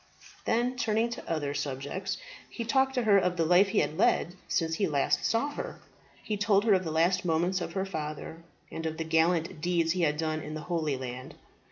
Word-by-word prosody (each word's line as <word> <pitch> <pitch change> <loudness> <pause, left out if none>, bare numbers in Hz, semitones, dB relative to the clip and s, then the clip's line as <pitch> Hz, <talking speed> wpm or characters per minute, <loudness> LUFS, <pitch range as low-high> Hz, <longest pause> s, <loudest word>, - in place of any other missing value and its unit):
Then 245 +2 +1
turning 225 0 +1
to 235 - -7
other 145 -3 -1
subjects, 145 +7 -3 0.3
he 230 - -5
talked 265 +3 +2
to 250 - +1
her 205 -3 +5
of 180 -1 0
the 165 - +2
life 180 +4 +5
he 195 - -2
had 155 - -3
led 175 - +3
since 165 -1 0
he 195 +5 +1
last 145 0 +1
saw 230 +6 +1
her. - - -6 0.4
He 210 - -2
told 205 -1 +3
her 215 - +5
of 185 -1 +2
the 165 - -3
last 170 +3 +2
moments 175 +2 +1
of 165 - -4
her 190 +1 -1
father, 160 -2 -5 0.3
and 160 0 -4
of 160 0 -4
the 165 - -2
gallant 160 +1 +1
deeds 170 -1 +1
he 180 +1 0
had 150 -2 +2
done 155 0 -1
in 155 0 -6
the 155 - -5
Holy 155 -4 -1
Land. 130 0 -7
170 Hz, 215 wpm, -29 LUFS, 155-195 Hz, 0.4 s, her